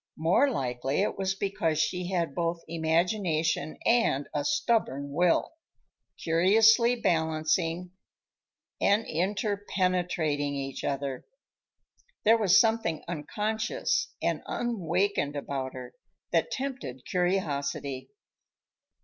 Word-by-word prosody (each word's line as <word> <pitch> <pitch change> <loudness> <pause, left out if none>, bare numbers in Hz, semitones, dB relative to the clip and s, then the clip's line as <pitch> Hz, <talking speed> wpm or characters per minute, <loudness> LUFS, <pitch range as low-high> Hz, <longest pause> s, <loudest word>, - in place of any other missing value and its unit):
More 170 - +3
likely 135 - -1
it - - -1
was 195 0 -1
because 170 -6 -1
she 180 +3 -1
had 170 -6 -1
both 170 0 -2
imagination 165 0 0
and 230 - +2
a 145 - -1
stubborn 225 - 0
will, 175 - +2 0.6
curiously 220 +8 +4
balancing 165 -2 0 0.9
and 210 +3 +3
interpenetrating 180 - -1
each 135 -1 -5
other. 135 -2 -3 1.0
There 225 +2 +6
was 195 -5 +5
something 220 -8 +1
unconscious 215 - -2
and - - 0
unawakened 190 -8 -1
about 135 -2 -4
her, 125 -1 -8 0.4
that - - +2
tempted 255 - -5
curiosity. 145 -7 -1
170 Hz, 95 wpm, -28 LUFS, 145-205 Hz, 1.0 s, There